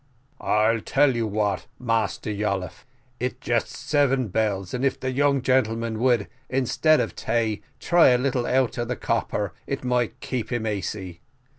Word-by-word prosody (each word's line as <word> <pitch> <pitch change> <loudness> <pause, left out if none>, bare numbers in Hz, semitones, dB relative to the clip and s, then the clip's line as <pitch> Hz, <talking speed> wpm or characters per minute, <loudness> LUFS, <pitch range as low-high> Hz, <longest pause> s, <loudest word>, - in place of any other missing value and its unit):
"I 110 +2 +2
tell 135 +3 +2
you 115 -1 0
what, 105 -1 -1
Massa 115 -4 -1
Yolliffe, 100 -2 -3 0.3
it 125 +1 -3
just 120 -5 0
seven 135 -3 +1
bells, 95 -2 -1
and 125 +1 -2
if 135 - +1
the 130 - -2
young 140 0 +2
gentleman 115 -3 +1
would, 125 -1 +2 0.2
instead 135 +4 +3
of - - -2
tay, 110 -2 -1 0.2
try 175 -1 +5
a 125 - +5
little 125 -1 0
out 130 -1 +1
of 120 - -1
the 125 - -2
copper, 105 -4 -1
it 135 - -3
might 125 -2 0
keep 125 -2 -4
him 120 -2 -1
asy. 95 -4 -4
120 Hz, 160 wpm, -24 LUFS, 110-130 Hz, 0.3 s, try